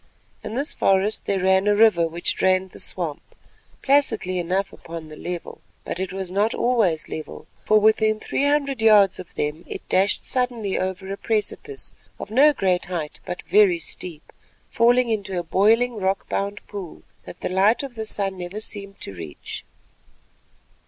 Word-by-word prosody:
Into 225 Hz, -, -5 dB
this 285 Hz, +3 st, 0 dB
forest 195 Hz, +2 st, +1 dB
there 195 Hz, -2 st, 0 dB
ran 190 Hz, +1 st, +3 dB
a 205 Hz, -, +4 dB
river 205 Hz, -6 st, +5 dB
which 170 Hz, +2 st, -2 dB
drained 185 Hz, 0 st, +1 dB
the -, -, -11 dB
swamp, -, -, +1 dB, 0.6 s
placidly 225 Hz, -10 st, +2 dB
enough 185 Hz, +3 st, -1 dB
upon 165 Hz, -1 st, -9 dB
the 155 Hz, -, -10 dB
level. 175 Hz, +2 st, -6 dB, 0.2 s
But -, -, -4 dB
it 190 Hz, 0 st, -3 dB
was 190 Hz, -1 st, -4 dB
not 205 Hz, +4 st, +1 dB
always 225 Hz, -10 st, +1 dB
level, 155 Hz, -, -7 dB, 0.2 s
for 215 Hz, 0 st, +5 dB
within 215 Hz, 0 st, +3 dB
three 275 Hz, -, -1 dB
hundred 280 Hz, -4 st, +1 dB
yards 210 Hz, -4 st, +5 dB
of 185 Hz, -, -10 dB
them 150 Hz, +3 st, -2 dB
it -, -, -8 dB
dashed 195 Hz, +2 st, +2 dB
suddenly 245 Hz, -6 st, -1 dB
over 190 Hz, +1 st, -3 dB
a -, -, -6 dB
precipice, 225 Hz, -, -3 dB, 0.2 s
of -, -, -8 dB
no 280 Hz, +6 st, +6 dB
great 185 Hz, -9 st, 0 dB
height 170 Hz, -4 st, -5 dB
but 180 Hz, -, -5 dB
very 200 Hz, -4 st, +4 dB
steep, 165 Hz, -1 st, -7 dB, 0.4 s
falling 240 Hz, +2 st, +4 dB
into 200 Hz, -4 st, -2 dB
a 175 Hz, -, -1 dB
boiling 225 Hz, +7 st, +3 dB
rock 195 Hz, -1 st, -1 dB
bound 200 Hz, +1 st, -3 dB
pool 195 Hz, -5 st, -8 dB, 0.2 s
that 175 Hz, -, -11 dB
the -, -, -2 dB
light 195 Hz, +7 st, +3 dB
of 275 Hz, -3 st, -6 dB
the 220 Hz, -2 st, -5 dB
sun 195 Hz, -3 st, -3 dB
never 180 Hz, +4 st, -5 dB
seemed 200 Hz, -2 st, -6 dB
to -, -, -6 dB
reach. 80 Hz, -5 st, -8 dB
195 Hz, 170 wpm, -23 LUFS, 180-220 Hz, 0.6 s, no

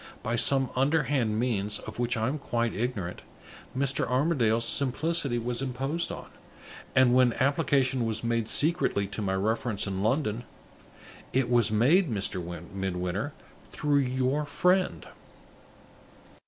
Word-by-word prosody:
By 115 Hz, -, -1 dB
some 130 Hz, +3 st, +3 dB
underhand 135 Hz, -5 st, +1 dB
means, 105 Hz, -4 st, 0 dB
of 110 Hz, -, -9 dB
which 120 Hz, 0 st, 0 dB
I 110 Hz, 0 st, 0 dB
am 145 Hz, +4 st, -2 dB
quite 120 Hz, -4 st, -1 dB
ignorant, 105 Hz, -6 st, -3 dB, 0.6 s
Mr. 135 Hz, 0 st, +1 dB
Armadale's 125 Hz, -5 st, +2 dB
simplicity 140 Hz, 0 st, +1 dB
was 120 Hz, +1 st, -2 dB
imposed 135 Hz, +6 st, -2 dB
on; -, -, -7 dB, 0.7 s
and, 130 Hz, -2 st, +5 dB
when 125 Hz, -2 st, +4 dB
application 135 Hz, -3 st, +1 dB
was 110 Hz, 0 st, -3 dB
made 115 Hz, -1 st, -1 dB
secretly 145 Hz, -7 st, +2 dB
to 100 Hz, +2 st, -5 dB
my 95 Hz, -2 st, -1 dB
reference 110 Hz, +1 st, 0 dB
in 95 Hz, -1 st, -3 dB
London, 115 Hz, 0 st, 0 dB, 0.9 s
it 130 Hz, -2 st, +1 dB
was 120 Hz, -3 st, +3 dB
made, 140 Hz, -, +3 dB
Mr. 100 Hz, -4 st, -1 dB, 0.3 s
Midwinter, 95 Hz, +6 st, -3 dB, 0.3 s
through 145 Hz, -1 st, 0 dB
your 130 Hz, +2 st, 0 dB
friend." 180 Hz, +5 st, +1 dB
125 Hz, 125 wpm, -28 LUFS, 110-140 Hz, 0.9 s, and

